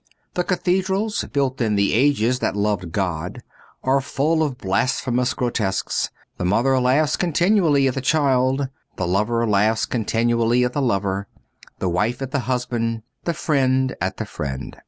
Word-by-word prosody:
The 180 - 0
^ - - -19
cathedrals, 190 +3 0
built 135 -2 0
in 110 -3 +1
the 100 0 +2
ages 125 -1 +2
that - - -1
loved 100 -4 -1
God, 90 -2 -3 0.4
are 135 +1 +2
full 155 +4 0
of 145 -5 -1
blasphemous 125 +4 0
grotesques. 110 -6 -1 0.3
The - - -2
mother 120 +9 +2
laughs 140 +5 +2
continually 170 -4 +3
at 130 - 0
the 135 - -3
child, 135 -1 +2 0.3
the 95 - -2
lover 105 +6 +1
laughs 110 +1 +2
continually 115 +1 +1
at 125 - -2
the 145 - 0
lover, 100 -5 0 0.5
the 95 - -2
wife 105 +8 0
at 135 - -5
the 140 - 0
husband, 115 -3 -1 0.2
the 170 - 0
friend 130 -4 +1
at 95 +1 -2
the 110 - -3
friend. 70 -9 -5
125 Hz, 155 wpm, -22 LUFS, 105-140 Hz, 0.5 s, continually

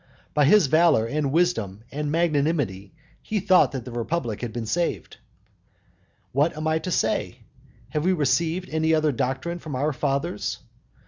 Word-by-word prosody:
By 150 -1 +4
his 205 +4 +6
valour, 155 -5 +4
and 140 +3 -1
wisdom, 115 - 0
and 150 0 -3
magnanimity 150 - 0 0.3
he 215 - -2
thought 185 -1 +4
that 130 -3 -5
the 125 - -7
republic 120 -1 -3
had 120 -2 -4
been 115 0 -4
saved. 170 +10 -2 1.1
What 150 +4 +1
am 155 - -4
I 160 0 +1
to 185 - -5
say? - - 0 0.5
Have 150 +3 -2
we 185 - +3
received 165 +4 0
any 160 +1 +2
other 155 -1 +2
doctrine 135 +7 -2
from 155 -5 -6
our 145 +4 0
fathers? 140 +6 -2
150 Hz, 155 wpm, -24 LUFS, 130-170 Hz, 1.1 s, his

